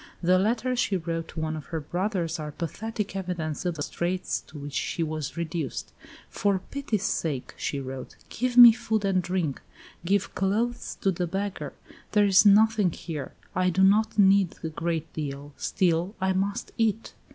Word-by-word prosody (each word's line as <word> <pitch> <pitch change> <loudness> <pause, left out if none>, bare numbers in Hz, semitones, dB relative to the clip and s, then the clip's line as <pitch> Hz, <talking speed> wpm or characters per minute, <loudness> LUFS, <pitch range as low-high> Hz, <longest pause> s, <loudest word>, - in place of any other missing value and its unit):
The 180 +2 +4
letters 240 +5 0
she 200 -5 +1
wrote 165 -1 -3
to - - -8
one 155 0 -2
of 155 - -8
her 165 - -3
brothers 175 +1 -2
are 150 -1 -5
pathetic 210 +6 -4
evidence 175 -4 -3
of 175 - -1
the 145 - -3
straits 180 +4 -2
to 155 - -11
which 145 0 -7
she 165 - -1
was 155 -1 -4
reduced. 165 -4 -4 0.3
"For 200 -1 +1
pity's 245 -8 -2
sake," 145 -6 -2
she 140 - -3
wrote, 130 -1 -7
"give 250 +1 -2
me 240 -1 +12
food 220 -2 -1
and 190 -2 +2
drink. 180 -6 -2 0.4
Give 195 +2 0
clothes 220 +6 -1
to 195 - +3
the 175 0 -2
beggar. 195 +3 -3 0.4
There 210 -1 +5
is 200 +1 +6
nothing 210 -2 +5
here. 155 -4 -6 0.2
I 185 0 +2
do 190 +2 +2
not 210 +4 +4
need 195 -3 +5
a 160 - -2
great 165 0 -3
deal; 145 -1 -5
still 180 +1 0
I 190 0 +1
must 195 +2 -2
eat." 225 0 0
185 Hz, 175 wpm, -27 LUFS, 160-205 Hz, 0.4 s, me